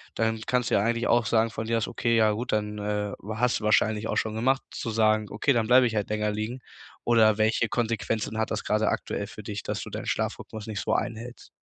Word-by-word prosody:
dann 110 Hz, 0 st, 0 dB
kannst 125 Hz, -1 st, +1 dB
du -, -, +2 dB
ja 100 Hz, -, +3 dB
eigentlich 115 Hz, +2 st, 0 dB
auch 120 Hz, -1 st, +3 dB
sagen 115 Hz, 0 st, +2 dB
von 110 Hz, 0 st, -5 dB
dir 115 Hz, +1 st, +1 dB
aus, 110 Hz, -, -2 dB
okay, 115 Hz, -2 st, 0 dB
ja 110 Hz, -1 st, +4 dB
gut, 120 Hz, +4 st, -3 dB
dann, 105 Hz, 0 st, -1 dB
äh 105 Hz, 0 st, -2 dB, 0.2 s
hast 125 Hz, +2 st, +1 dB
du -, -, -11 dB
wahrscheinlich 105 Hz, 0 st, +2 dB
auch -, -, -2 dB
schon 110 Hz, -1 st, -1 dB
gemacht, 130 Hz, +4 st, +2 dB
zu 115 Hz, -, -4 dB
sagen: 110 Hz, -1 st, +3 dB
„Okay, 110 Hz, +7 st, +1 dB
dann 115 Hz, -3 st, +1 dB
bleibe 125 Hz, 0 st, +6 dB
ich 115 Hz, -, -4 dB
halt 105 Hz, -2 st, -1 dB
länger 105 Hz, 0 st, 0 dB
liegen”, 110 Hz, +4 st, -4 dB, 0.4 s
oder 110 Hz, -3 st, +4 dB
welche 110 Hz, +1 st, +2 dB
Konsequenzen 110 Hz, -1 st, -1 dB
hat 110 Hz, -, -1 dB
das 110 Hz, -, -2 dB
gerade 110 Hz, +1 st, +1 dB
aktuell -, -, -3 dB
für -, -, -10 dB
dich, -, -, -5 dB
dass -, -, -3 dB
du -, -, -7 dB
deinen -, -, -6 dB
Schlafrhythmus 110 Hz, 0 st, -3 dB
nicht 105 Hz, -2 st, -4 dB
so -, -, -1 dB
einhältst? 120 Hz, +2 st, -4 dB
110 Hz, 235 wpm, -27 LUFS, 105-115 Hz, 0.4 s, bleibe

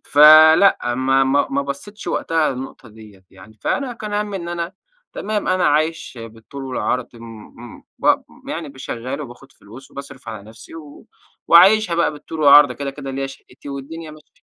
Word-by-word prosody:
فلأ، 155 Hz, -2 st, +6 dB
ما 135 Hz, +1 st, +2 dB
ما 135 Hz, +2 st, +1 dB
ما 140 Hz, +1 st, 0 dB
بصّيتش 200 Hz, +10 st, -8 dB
وقتها 160 Hz, -2 st, 0 dB
للنُقطة 130 Hz, -1 st, -8 dB
ديّة. 105 Hz, -3 st, -16 dB
يعني 100 Hz, +3 st, -17 dB
فأنا 270 Hz, -3 st, -2 dB
كان 215 Hz, -3 st, -8 dB
هَمّي 205 Hz, -1 st, -2 dB
إن 170 Hz, -2 st, -7 dB
أنا 170 Hz, +1 st, -4 dB, 0.4 s
تمام 210 Hz, 0 st, -3 dB
أنا 185 Hz, 0 st, +1 dB
عايش 155 Hz, -2 st, -1 dB
بالطول 115 Hz, +5 st, -10 dB
والعرض 125 Hz, -1 st, -2 dB
م 115 Hz, 0 st, -12 dB, 0.5 s
م -, -, -19 dB, 0.2 s
ب -, -, +2 dB, 0.3 s
يعني 140 Hz, -, -6 dB
شّغال، 130 Hz, +3 st, -6 dB
وباخد 135 Hz, -1 st, -11 dB
فلوس، 115 Hz, +6 st, -15 dB
وباصرف 140 Hz, -3 st, -11 dB
على 110 Hz, -2 st, -7 dB
نفسي، 110 Hz, +7 st, -14 dB
و 150 Hz, -3 st, -12 dB, 0.4 s
وعايشها 190 Hz, +2 st, +6 dB
بقى 170 Hz, -2 st, +1 dB
بالطول 150 Hz, +2 st, -9 dB
والعرض، 145 Hz, 0 st, +7 dB
ده 125 Hz, -, -7 dB
كده 140 Hz, +1 st, -5 dB
كده 135 Hz, 0 st, -8 dB
ليّا 135 Hz, +1 st, -3 dB
شَقِّتي، 135 Hz, +1 st, -14 dB
والدنيا 155 Hz, +4 st, -8 dB
ماشية. 155 Hz, 0 st, -19 dB
140 Hz, 170 wpm, -19 LUFS, 130-165 Hz, 0.5 s, والعرض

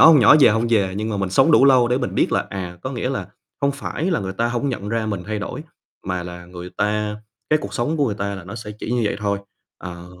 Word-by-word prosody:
nhỏ -, -, +10 dB
hông 160 Hz, -3 st, +8 dB
nhỏ, 125 Hz, +5 st, +8 dB
già 105 Hz, -, +7 dB
hông 115 Hz, +1 st, 0 dB
già, 100 Hz, -4 st, +2 dB
nhưng 105 Hz, +3 st, -3 dB
mà 105 Hz, -, -1 dB
mình 95 Hz, -1 st, -1 dB
sống 135 Hz, +10 st, +4 dB
đủ 135 Hz, -, +7 dB
lâu 130 Hz, -3 st, +6 dB
để 125 Hz, +1 st, +2 dB
mình 125 Hz, -, -3 dB
biết -, -, +2 dB
là, -, -, +1 dB
à, 90 Hz, -3 st, -5 dB
có 130 Hz, -, -3 dB
nghĩa 125 Hz, +1 st, -2 dB
là, 130 Hz, -, -3 dB, 0.3 s
không 140 Hz, 0 st, +2 dB
phải 145 Hz, +3 st, -4 dB
là 135 Hz, -, +1 dB
người 95 Hz, -1 st, -4 dB
ta 115 Hz, +4 st, 0 dB
hổng 125 Hz, +4 st, -1 dB
nhận 105 Hz, -5 st, -4 dB
ra 115 Hz, -1 st, -1 dB
mình 100 Hz, -4 st, -3 dB
thay 110 Hz, -1 st, -2 dB
đổi, 150 Hz, +8 st, -5 dB, 0.4 s
mà 90 Hz, -1 st, -2 dB
là 90 Hz, 0 st, -8 dB
người 90 Hz, 0 st, -9 dB
ta 105 Hz, 0 st, 0 dB, 0.3 s
cái 155 Hz, -, +5 dB
cuộc -, -, -6 dB
sống 150 Hz, +7 st, 0 dB
của 145 Hz, -2 st, +2 dB
người 105 Hz, -, -1 dB
ta 100 Hz, 0 st, -3 dB
là 95 Hz, -3 st, -8 dB
nó 100 Hz, +4 st, -8 dB
sẽ 110 Hz, -2 st, -7 dB
chỉ 110 Hz, -, -5 dB
như 125 Hz, -, +1 dB
vậy -, -, 0 dB
thôi. 100 Hz, -1 st, 0 dB, 0.4 s
Ờ, 85 Hz, -1 st, -8 dB
105 Hz, 290 wpm, -21 LUFS, 95-125 Hz, 0.4 s, nhỏ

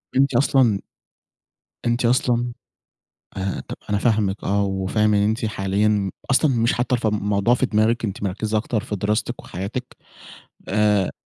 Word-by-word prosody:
أنتِ 135 Hz, 0 st, +3 dB
أصلًا 120 Hz, -5 st, +3 dB, 1.1 s
أنتِ 120 Hz, +1 st, +1 dB
أصلًا 120 Hz, 0 st, +1 dB, 0.8 s
آآ، 95 Hz, 0 st, -2 dB
طَب -, -, -5 dB
أنا 105 Hz, -, +2 dB
فاهمِك 105 Hz, -3 st, 0 dB
آه، 100 Hz, +1 st, +1 dB
وفاهم 100 Hz, +2 st, +1 dB
إن 100 Hz, -, +3 dB
أنتِ 110 Hz, +3 st, 0 dB
حاليًا 100 Hz, 0 st, 0 dB, 0.2 s
أصلًا 140 Hz, +3 st, +4 dB
مش 115 Hz, +1 st, +2 dB
حاطّة 125 Hz, +1 st, 0 dB
الف 120 Hz, -2 st, -1 dB
الموضوع 105 Hz, +2 st, +2 dB
في 130 Hz, -, +1 dB
دماغِك، 115 Hz, +1 st, +1 dB
أنتِ 100 Hz, -1 st, -4 dB
مركِّزة 105 Hz, +2 st, -1 dB
أكتر 110 Hz, 0 st, -1 dB
في 105 Hz, -, -4 dB
دراستِك 105 Hz, +3 st, -1 dB
وحياتِك. 100 Hz, +8 st, -6 dB, 0.7 s
آآ، 105 Hz, -1 st, +2 dB
105 Hz, 145 wpm, -22 LUFS, 100-120 Hz, 1.1 s, أصلًا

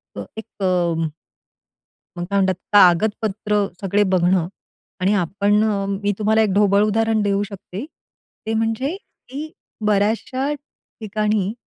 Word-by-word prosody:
अ, -, -, -5 dB
एक 220 Hz, -, -6 dB, 0.2 s
अ 170 Hz, -3 st, +1 dB, 1.1 s
मग 175 Hz, -, -3 dB
काय 200 Hz, -, 0 dB
म्हणतात, 190 Hz, -1 st, +2 dB, 0.2 s
कागदपत्र 205 Hz, +2 st, +3 dB, 0.2 s
सगळे 200 Hz, +2 st, +2 dB
बघणं 180 Hz, -1 st, +3 dB, 0.5 s
आणि 190 Hz, +3 st, +2 dB
आपण 200 Hz, +4 st, +2 dB
अ, 200 Hz, -2 st, -1 dB
मी 200 Hz, +1 st, -1 dB
तुम्हाला 220 Hz, +1 st, +3 dB
एक 215 Hz, -, +2 dB
ढोबळ 200 Hz, 0 st, +4 dB
उदाहरण 220 Hz, +1 st, +1 dB
देऊ 200 Hz, 0 st, +1 dB
शकते. 200 Hz, +3 st, -7 dB, 0.6 s
ते 220 Hz, -, -1 dB
म्हणजे 225 Hz, +9 st, -1 dB, 0.3 s
की 300 Hz, +4 st, -6 dB, 0.3 s
बर्‍याचशा 220 Hz, +7 st, +1 dB
ठिकाणी 215 Hz, -7 st, -3 dB
205 Hz, 125 wpm, -21 LUFS, 195-220 Hz, 1.1 s, ढोबळ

